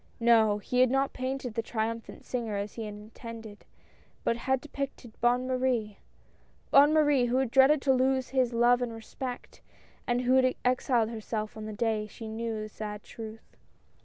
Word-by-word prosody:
No, 225 -3 +4
he 250 +4 -2
had 255 -1 +6
not 270 +2 +1
painted 255 -2 -3
the 230 - -1
triumphant 225 0 -4
singer 230 -4 -3
as 200 +1 -4
he 225 - -5
had 210 -1 -6
intended, 220 0 -10 0.6
but 230 - +1
had 265 +2 0
depicted 275 -4 -6
Bonne 245 +1 +3
Marie, 250 -5 -1 0.3
— - - -35
Bonne 285 +2 +7
Marie, 295 -5 +4
who 245 +1 0
had 265 -3 0
dreaded 270 +2 +5
to 270 - +4
lose 260 0 +1
his 255 -2 +1
love 240 +1 +4
and 240 -2 -2
respect, 245 +3 -7 0.5
and 240 0 +1
who 250 +1 +2
had 255 -1 +3
exiled 250 -2 +2
herself 220 -1 -4
on 215 -1 -7
the - - -5
day 215 0 -1
she 220 +2 -9
knew 220 0 -3
the 215 - -7
sad 210 0 -6
truth. 220 -1 -10
235 Hz, 180 wpm, -29 LUFS, 220-255 Hz, 0.6 s, Bonne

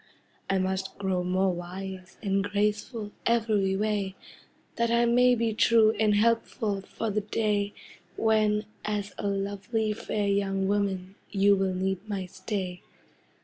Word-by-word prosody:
I 195 - +2
must 190 0 -2
grow 190 -2 0
more 185 +1 +1
wise 185 +1 -7
and 195 -1 +1
graceful 210 +2 -1 0.2
Every 215 -5 +2
way, 205 -2 -1 0.6
That 235 0 +2
I 235 +1 +3
may 245 +1 +5
be 230 -1 0
true 220 0 +5
and 215 -2 +4
helpful 220 -2 +1
For 220 +3 -4
the 210 +1 0
day 205 -1 0 0.4
When, 215 -1 +2 0.2
as 205 -2 -2
lovely 205 +2 -1
fair 210 -1 -2
young 195 -1 +1
woman, 195 -2 -1 0.2
You 200 0 +4
will 190 -1 0
need 190 0 -1
my 195 -2 -2
stay. 185 -1 -4
200 Hz, 135 wpm, -28 LUFS, 190-215 Hz, 0.6 s, may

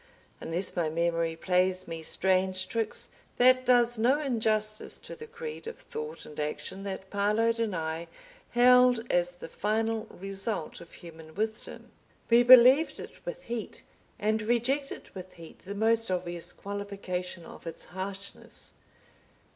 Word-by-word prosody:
Unless 175 +4 -1
my 170 -3 0
memory 165 0 0
plays 185 +2 +1
me 165 -1 -5
strange 185 +2 +2
tricks 225 0 -2 0.3
that 255 +1 +6
does 240 -2 +4
no 255 +6 +3
injustice 220 -6 0
to - - -9
the 460 -1 -10
creed 470 0 -7
of 465 - -6
thought 455 +1 -7
and 150 - -10
action 150 +6 -4
that 190 -1 -6
Parload 215 +3 +1
and 220 -4 0
I 160 +1 -3 0.4
held 250 -1 +5
as 175 0 +1
the 175 - -9
final 220 +4 -1
result 195 -1 -4
of 170 - -13
human 160 -2 -12
wisdom. 220 +2 -4 0.4
We 235 +1 +7
believed 255 +5 +7
it - - -10
with - - -5
heat, 235 -3 -6 0.3
and 215 +1 0
rejected 240 +5 0
with 185 -1 -9
heat 165 -1 -13
the 200 +2 -6
most 225 +1 +3
obvious 175 -2 -1
qualification 195 -4 -5
of - - -11
its 165 - -6
harshness. 195 +2 -6
205 Hz, 140 wpm, -29 LUFS, 180-235 Hz, 0.4 s, We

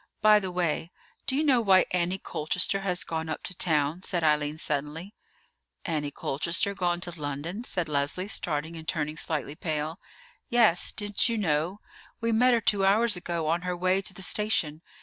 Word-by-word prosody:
"By 215 0 +7
the 190 -2 -4
way, 170 -2 -1 0.4
do 265 - +1
you 300 - +2
know 265 -5 +4
why 190 -4 +5
Annie 180 +1 0
Colchester 180 +3 -1
has 180 -2 0
gone 160 -1 -4
up - - -4
to 180 - -4
town?" 155 -1 +1
said 175 -2 -1
Eileen 150 -1 +2
suddenly. 155 +5 -3 0.7
"Annie 150 -4 -1
Colchester 170 +8 -1
gone 175 -3 0
to 175 -3 -6
London?" 150 - -4
said 180 -8 -1
Leslie, 145 +6 0
starting 160 -5 -2
and 160 -1 -9
turning 155 -2 -1
slightly 150 -3 -1
pale. 155 0 -3 0.5
"Yes: 225 -8 +4
didn't 205 +2 0
you 230 - -1
know? 175 +1 0 0.4
We 230 0 0
met 245 +2 +4
her 230 - 0
two 205 -2 +2
hours 210 +3 +4
ago 170 -2 -3
on 165 +2 +1
her 180 0 -3
way 185 +2 +2
to 190 - -5
the 190 - -3
station. 175 -8 +2
175 Hz, 180 wpm, -27 LUFS, 155-195 Hz, 0.7 s, By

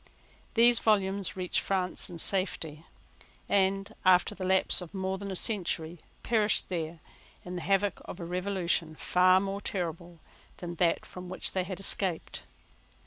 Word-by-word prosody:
These 235 0 +6
volumes 200 -2 +1
reached 180 -1 0
France 185 -1 0
in 175 - -8
safety, 165 -4 0 0.6
and, 195 0 +1
after 185 +2 +4
the 190 -2 -4
lapse 190 0 +2
of 180 +2 -9
more 190 0 -2
than 200 0 -6
a 190 - -4
century, 175 -5 0 0.2
perished 215 -2 +1
there 165 -2 -4 0.4
in 180 0 -6
the 175 - -4
havoc 195 0 +1
of - - -8
a 170 - -5
revolution 180 -3 -1
far 185 +3 +4
more 195 +1 -3
terrible 170 -2 -4 0.4
than 175 -1 -6
that 170 -1 +1
from 180 0 -9
which 185 - -3
they 185 -1 -1
had 185 0 -6
escaped. 190 -3 +1
185 Hz, 150 wpm, -29 LUFS, 175-195 Hz, 0.6 s, These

